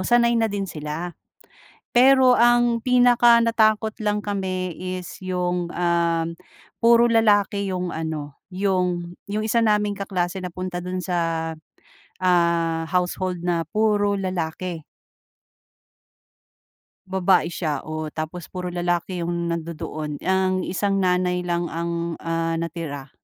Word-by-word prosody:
sanay 235 +4 +3
na 225 -1 +2
din 200 -1 -2
sila. 160 +1 -5 0.8
Pero 260 0 +6
ang 240 -1 +3
pinaka-natakot 235 -3 +4
lang 210 0 +1
kami 185 -4 -3 0.2
is 180 - -9
'yong, 180 -1 -1
uhm, 170 -1 0 0.5
puro 235 0 +6
lalaki 205 -3 +2
'yong 180 -2 -3
ano 155 -3 -4 0.2
'yong 180 -2 -1 0.2
'yong 215 +1 -1
isa 230 +1 +2
naming 210 -2 +2
kaklase 190 -2 -3
napunta 180 0 -5
do'n 185 0 -3
sa, 165 -2 -1 0.7
ah, 170 -2 +2
household 180 0 -1
na 170 -1 0
puro 205 +2 +1
lalaki. 175 -2 -3 2.3
Babae 185 -2 +3
siya, 155 -5 -2
o 155 -1 -5
tapos 160 +2 -5
puro 180 -1 -5
lalaki 175 0 -2
'yong 170 0 -2
nandu-doon. 160 -3 -5
Ang 185 0 +1
isang 195 +2 0
nanay 180 -1 +1
lang 175 -1 -1
ang 170 0 -3
ah, 165 0 -1
natira, 165 -4 -5
180 Hz, 115 wpm, -23 LUFS, 170-205 Hz, 2.3 s, Pero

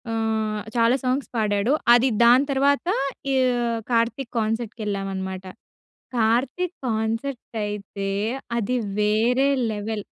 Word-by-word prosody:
ఆహ్, 220 -1 -1
చాలా 230 +1 +4
సాంగ్స్ 255 +2 -1
పాడాడు. 210 +3 +1 0.2
అది 240 +2 +5 0.2
దాని 245 +4 +6
తర్వాత 280 +3 +2 0.5
ఈ - - +2 0.6
కార్తీక్ 235 +2 0
కాన్సర్ట్‌కేళ్ళామనమాట. 200 -4 -3 0.7
కార్తీక్ 255 +11 +1
కాన్సర్ట్ 225 +3 -2 0.2
అయితే 200 -1 -5 0.5
అది 235 +2 0 0.3
వేరే 235 +6 +3 0.2
లెవెల్. 210 0 -4
225 Hz, 95 wpm, -23 LUFS, 210-250 Hz, 0.7 s, దాని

